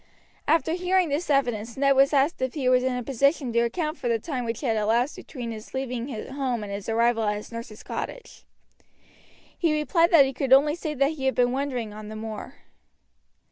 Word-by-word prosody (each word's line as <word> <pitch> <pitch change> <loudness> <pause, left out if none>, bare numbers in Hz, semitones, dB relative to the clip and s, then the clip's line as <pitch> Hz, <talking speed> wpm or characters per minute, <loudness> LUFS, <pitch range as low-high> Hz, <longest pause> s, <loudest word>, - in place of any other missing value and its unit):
After 320 +1 +2
hearing 365 -1 +1
this 300 +4 -2
evidence 240 -5 0
Ned 275 0 +3
was 275 +1 +5
asked 285 +3 +2
if 260 +2 -2
he 270 -4 -1
was 255 0 +4
in 260 -1 0
a 250 - -3
position 275 +1 +1
to 235 - +3
account 305 +7 -1
for 250 - -3
the 230 -1 +2
time 250 +1 -4
which 230 -1 -3
had 235 -6 0
elapsed 230 +6 +1
between 245 -5 -7
his 220 +3 -9
leaving 250 -2 -3 0.2
home 260 -5 -2
and 200 -1 -6
his 200 +2 -5
arrival 230 +1 +2
at 210 -1 +1
his 210 - -8
nurse's 230 -2 -8
cottage. - - -7 1.1
He 320 -3 +1
replied 330 +3 +3
that 310 -5 +7
he 270 - -3
could 265 0 +1
only 290 +3 +6
say 310 -2 -4
that 275 +2 +2
he 285 -4 -5
had 265 - +1
been 245 0 +3
wandering 255 -5 -3
on 215 0 -9
the 215 - -7
moor. 220 +4 -7
260 Hz, 210 wpm, -25 LUFS, 230-290 Hz, 1.1 s, that